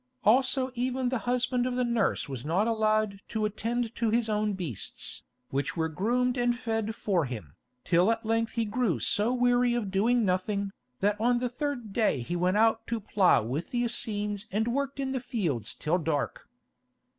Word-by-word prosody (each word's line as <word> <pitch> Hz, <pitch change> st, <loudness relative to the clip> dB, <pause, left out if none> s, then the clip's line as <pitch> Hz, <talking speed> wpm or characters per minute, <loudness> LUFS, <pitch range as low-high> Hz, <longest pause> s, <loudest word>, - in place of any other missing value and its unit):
Also 260 Hz, +3 st, +3 dB
even 255 Hz, +1 st, -1 dB
the 255 Hz, -1 st, -1 dB
husband 250 Hz, 0 st, +1 dB
of 250 Hz, -, -2 dB
the 250 Hz, -, +1 dB
nurse 235 Hz, -4 st, 0 dB
was 130 Hz, -4 st, -6 dB
not 175 Hz, +7 st, +1 dB
allowed 215 Hz, -2 st, +1 dB
to 220 Hz, -2 st, -1 dB
attend 230 Hz, +2 st, -2 dB
to 230 Hz, -1 st, 0 dB
his 225 Hz, 0 st, +1 dB
own 210 Hz, 0 st, +1 dB
beasts, 170 Hz, -, -4 dB, 0.3 s
which 140 Hz, +5 st, -2 dB
were 160 Hz, 0 st, +1 dB
groomed 245 Hz, -, 0 dB
and 240 Hz, 0 st, +2 dB
fed 225 Hz, -2 st, -2 dB
for 185 Hz, -8 st, +1 dB
him, 105 Hz, -, -7 dB, 0.3 s
till 180 Hz, +3 st, +3 dB
at 225 Hz, 0 st, -2 dB
length 225 Hz, 0 st, 0 dB
he 230 Hz, -1 st, 0 dB
grew 210 Hz, -, 0 dB
so 205 Hz, -, +2 dB
weary 245 Hz, -1 st, +3 dB
of 215 Hz, -5 st, -2 dB
doing 225 Hz, +4 st, +3 dB
nothing, 195 Hz, +2 st, 0 dB, 0.3 s
that 205 Hz, +1 st, +1 dB
on 240 Hz, +1 st, +3 dB
the 245 Hz, 0 st, -1 dB
third 245 Hz, -4 st, -4 dB
day 215 Hz, -, +2 dB
he 175 Hz, +9 st, -3 dB
went 180 Hz, +3 st, +2 dB
out 225 Hz, +1 st, +3 dB
to 230 Hz, -1 st, -1 dB
plough 195 Hz, -, +3 dB
with 135 Hz, +9 st, -3 dB
the 240 Hz, -1 st, 0 dB
Essenes 210 Hz, -3 st, -1 dB
and 220 Hz, +4 st, 0 dB
worked 275 Hz, +2 st, -2 dB
in 270 Hz, -1 st, -1 dB
the 265 Hz, -, -1 dB
fields 170 Hz, -, -2 dB
till 170 Hz, +4 st, 0 dB
dark. 150 Hz, -3 st, -2 dB
220 Hz, 185 wpm, -28 LUFS, 190-245 Hz, 0.3 s, Also